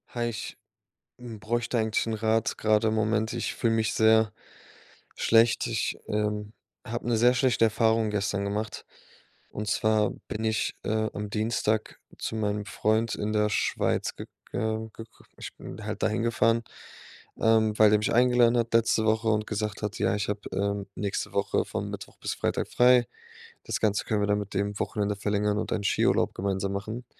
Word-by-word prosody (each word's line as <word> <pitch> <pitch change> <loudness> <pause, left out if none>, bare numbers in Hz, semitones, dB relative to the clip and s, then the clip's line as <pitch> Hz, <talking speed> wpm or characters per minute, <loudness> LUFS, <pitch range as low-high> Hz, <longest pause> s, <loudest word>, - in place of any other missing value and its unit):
Hi, 120 0 0
ich, 110 - -6 0.6
hm, 120 -3 -9
bräuchte 120 +3 -1
eigentlich 110 0 0
'n 115 - -2
Rat 110 0 0
grade 110 0 +3
im - - -1
Moment. 110 +1 0
Ich 120 - -3
fühle 115 -1 +1
mich 110 -1 0
sehr 110 -1 +4 0.8
schlecht. 115 0 +3
Ich, - - -1
ähm, 105 0 -2 0.3
habe 120 +1 -5
'ne 120 -2 +2
sehr 120 +2 +5
schlechte 125 -2 +3
Erfahrung 110 0 +2
gestern 100 -1 -1
gemacht, 105 +1 -4 0.6
und 105 +1 -5
zwar 110 +1 +2 0.2
bin 110 +1 -4
ich, 110 -1 -1
äh, 110 0 0
am 105 0 -5
Dienstag 110 0 -1 0.2
zu - - -3
meinem 105 -1 -1
Freund 110 +2 0
in 105 +1 -2
der 105 0 +2
Schweiz - - 0
gega 110 0 -5
gek 115 - -9 0.3
ich - - -8
bin - - -9
halt - - -4
dahin 110 +2 +1
gefahren, 115 -1 +2 0.8
ähm, 110 -1 +3
weil 110 -1 +8
der 105 - +5
mich 105 - -1
eingeladen 120 0 +4
hat 115 0 0
letzte 115 -1 +3
Woche 110 +1 +2
und 110 -1 +1
gesagt 105 -1 -3
hat: 105 +1 -3
„Ja, - - +2
ich 105 0 -2
habe, 105 0 -2
ähm, 100 0 -1
nächste 100 -2 -3
Woche - - 0
von - - -4
Mittwoch - - -8
bis - - -3
Freitag - - -1
frei. 125 -1 +5 0.6
Das - - -2
Ganze 105 -2 +1
können 105 -2 0
wir 105 - +1
dann 105 0 +2
mit 100 -1 -6
dem 100 +1 -1
Wochenende 105 -1 -1
verlängern 105 0 0
und - - -4
einen 100 - -2
Skiurlaub 100 - +2
gemeinsam 95 0 -2
machen.“ 110 +5 -5
110 Hz, 175 wpm, -27 LUFS, 105-115 Hz, 0.8 s, weil